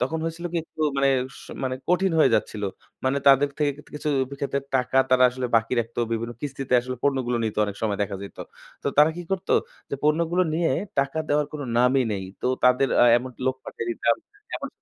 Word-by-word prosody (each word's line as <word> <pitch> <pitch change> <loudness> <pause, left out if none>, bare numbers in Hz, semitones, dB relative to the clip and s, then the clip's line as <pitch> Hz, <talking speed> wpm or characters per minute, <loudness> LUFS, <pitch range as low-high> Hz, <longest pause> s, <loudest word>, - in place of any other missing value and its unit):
তখন 145 +6 -1
হয়েছিল 165 +1 -4
কি - - -1
একটু 160 - -13 0.2
মানে 140 0 +3 0.4
স - - -14 0.2
মানে 130 0 -1
কঠিন 180 0 +2
হয়ে 145 -4 +5
যাচ্ছিল। 105 -1 -1 0.4
মানে 130 +2 +2
তাদের 140 +1 +6
থেক 145 -2 +2
থেকে - - -20
কিছু 150 - -3 0.3
ক্ষেত্রে 140 0 -1
টাকা 130 0 +2
তারা 130 0 +5
আসলে 125 0 -3
বাকি 115 +2 0
রাখতো। 115 +1 -7
বিভিন্ন 115 +1 -2
কিস্তিতে 135 -2 -2
আসলে 130 +1 -5
পণ্যগুলো 130 -4 +1
নিত 110 - -3
অনেক 100 -1 -5
সময় 105 -2 0
দেখা 100 -1 -3
যাইত। 100 - -10 0.4
তো - - -5
তারা 150 +2 +7
কি 175 - -5
করতো 190 - -1 0.4
যে - - -1
পণ্যগুলো 170 +4 +2
নিয়ে 165 0 +1 0.3
টাকা 140 +3 +1
দেওয়ার 145 0 +2
কোনো 150 -2 -5
নামই 130 +2 +4
নেই। 95 -1 -3 0.2
তো - - 0 0.2
তাদের 125 +1 +4
অ্যা 120 - +7
এমনকি 125 0 -10
লোক 130 0 +1
পাঠিয়ে 115 - -6
দিতাম। 115 0 +1 0.4
এমন - - -4
130 Hz, 205 wpm, -24 LUFS, 120-150 Hz, 0.4 s, তারা